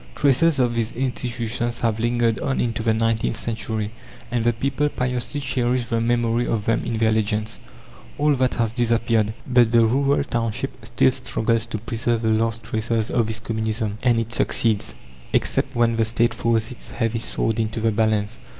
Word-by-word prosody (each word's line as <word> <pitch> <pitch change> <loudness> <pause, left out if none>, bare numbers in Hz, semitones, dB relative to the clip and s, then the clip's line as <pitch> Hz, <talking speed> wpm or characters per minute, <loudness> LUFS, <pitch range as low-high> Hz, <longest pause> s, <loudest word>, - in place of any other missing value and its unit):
Traces 145 +3 +4
of 125 -2 +2
these 115 0 -1
institutions 120 -2 -2
have 115 -2 0
lingered 115 -2 +1
on 135 - -1
into 115 -1 -1
the 110 0 +2
nineteenth 115 0 0
century, 110 -2 -3 0.4
and 120 -2 0
the 120 - +3
people 140 +5 -1
piously 125 +2 -2
cherish 125 -3 -1
the 115 -2 0
memory 120 0 +1
of 105 -3 -1
them 115 - +1
in 115 - -2
their 110 0 +3
legends. 110 0 -1 0.6
All 150 0 +3
that 130 0 +1
has 115 -2 0
disappeared. 115 -2 +1
But 120 -3 +4
the 115 -1 +5
rural 140 +5 +2
township 115 -2 -3
still 65 - +3
struggles 115 0 -1
to 115 - -3
preserve 115 +1 -1
the 110 - +2
last 115 +1 0
traces 110 0 -1
of 115 -3 +1
this 110 0 -2
Communism, 110 -2 -2
and 120 -3 +3
it 115 0 -2
succeeds 110 -3 +1 0.4
except - - 0
when 115 -1 +2
the 115 - +3
State 115 +1 +1
throws 115 0 0
its 125 - -8
heavy 115 -1 -1
sword 115 0 -1
into 110 0 -1
the 110 0 +2
balance. 110 0 0
115 Hz, 175 wpm, -22 LUFS, 110-120 Hz, 0.6 s, the